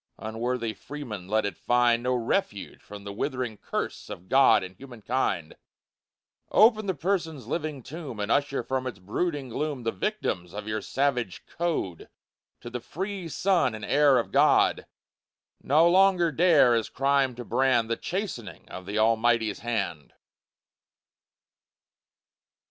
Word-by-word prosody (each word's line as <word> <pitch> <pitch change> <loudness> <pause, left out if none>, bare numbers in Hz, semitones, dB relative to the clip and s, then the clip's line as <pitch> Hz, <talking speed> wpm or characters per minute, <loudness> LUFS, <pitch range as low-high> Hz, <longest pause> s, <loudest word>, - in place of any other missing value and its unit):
Unworthy 115 +1 -3
freemen, 120 -11 -8
let 110 +2 +1
it 100 - -3
find 120 -1 +2
No 125 +1 0
refuge 120 - -2
from 105 -1 -11
the 100 0 -7
withering 125 0 -3
curse - - -5
Of 90 - -9
God 135 -7 +5
and 95 0 -9
human 125 -5 -12
kind 105 -10 -1 0.9
Open 215 -1 +4
the 190 - 0
prison's 165 -3 -2
living 150 -5 -4
tomb, 140 -5 -8
And 105 +2 -2
usher 140 -1 +1
from 130 -1 -2
its 125 - -6
brooding 135 - -3
gloom 145 +1 -3
The 115 - 0
victims 95 - -3
of 105 0 -6
your 110 0 -2
savage 125 -6 -1
code 160 - -3 0.5
To 120 - -8
the 125 0 -4
free 190 - -5
sun 175 - +1
and 110 - -7
air 145 -2 +4
of 115 - -1
God; - - +3 0.7
No 155 +5 +4
longer 180 -2 +4
dare 155 -6 +5
as 115 -1 0
crime 135 -1 +1
to 120 0 -8
brand 125 -3 +2
The 115 - 0
chastening 175 - -5
of 95 0 -9
the 105 +2 -3
Almighty's 115 0 +2
hand. 100 -10 -3
125 Hz, 145 wpm, -27 LUFS, 110-150 Hz, 0.9 s, God